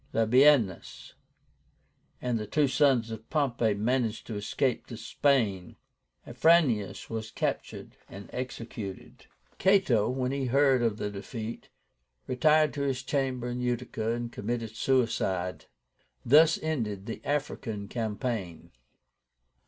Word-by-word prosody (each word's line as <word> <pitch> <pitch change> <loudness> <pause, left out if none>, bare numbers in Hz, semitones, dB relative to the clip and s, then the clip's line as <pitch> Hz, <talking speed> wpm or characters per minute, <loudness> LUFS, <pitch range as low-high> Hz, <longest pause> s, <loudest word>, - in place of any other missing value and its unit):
Labiénus 115 - +3 1.1
and 125 -2 0
the 105 - -5
two 150 +4 +2
sons 130 -5 +2
of 110 0 -8
Pompey 120 -8 +1
managed 115 +1 -1
to 115 - -6
escape 115 +5 -1
to 115 - -8
Spain. 115 - 0 0.5
Afranius 125 - +2
was 110 -1 -5
captured - - -4
and 100 0 -10
executed. 115 -6 -7 0.3
Cato, 190 - +3
when 130 0 -1
he 140 -1 -2
heard 135 0 +3
of 115 -3 0
the 105 - -3
defeat, 110 +3 -7 0.6
retired 155 +4 +3
to 145 - -4
his 135 -2 -1
chamber 130 -3 -1
in 125 0 -4
Utica, 120 -2 -2
and 120 0 -2
committed 115 0 -4
suicide. 95 -9 0 0.6
Thus 155 +6 +6
ended 110 -11 -2
the 115 - -6
African 125 -8 -3
campaign. 110 -5 -4
120 Hz, 115 wpm, -28 LUFS, 110-135 Hz, 1.1 s, Thus